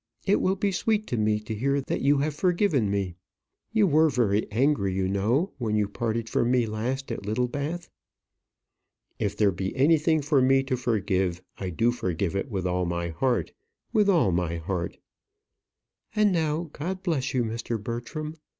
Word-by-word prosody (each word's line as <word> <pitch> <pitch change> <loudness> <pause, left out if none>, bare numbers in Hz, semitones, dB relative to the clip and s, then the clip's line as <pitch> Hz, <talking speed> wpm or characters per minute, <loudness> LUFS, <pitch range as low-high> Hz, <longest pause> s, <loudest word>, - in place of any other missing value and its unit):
It 200 - +3
will 190 +1 +2
be 200 +1 0
sweet 215 +3 0
to - - 0
me 105 0 +2
to 105 +1 -5
hear 140 +6 +1
that 135 - -3
you 140 +1 +4
have 150 +1 0
forgiven 170 - +2
me. 95 -3 -2 0.5
You 220 -2 +4
were 160 -2 +4
very 110 -6 +1
angry, 120 -3 +2
you 95 -1 0
know, 115 - +1
when 110 -3 -1
you 105 -1 +2
parted 115 +1 -2
from 120 +1 +1
me 125 -2 +3
last 120 +5 -3
at - - -4
Littlebath." 140 - -2 1.3
"If 100 0 -1
there 105 -2 +4
be 95 +1 -4
anything 155 +2 +3
for 145 -2 +3
me 135 +1 +4
to 135 -1 -1
forgive, 95 -7 0 0.2
I 95 - -3
do 115 +8 +2
forgive 95 -5 -2
it 100 +7 -2
with 95 -5 -3
all 90 0 0
my 85 0 -2
heart; 115 - 0 0.4
with 210 -3 +4
all 165 - +4
my 85 -1 0
heart." 85 +1 -3 1.2
"And 210 -1 +4
now, 160 -1 -1
God 185 +5 -4
bless 140 -8 -1
you, 125 - +2
Mr. 115 0 -3
Bertram. 120 +8 -5
120 Hz, 175 wpm, -26 LUFS, 100-150 Hz, 1.3 s, you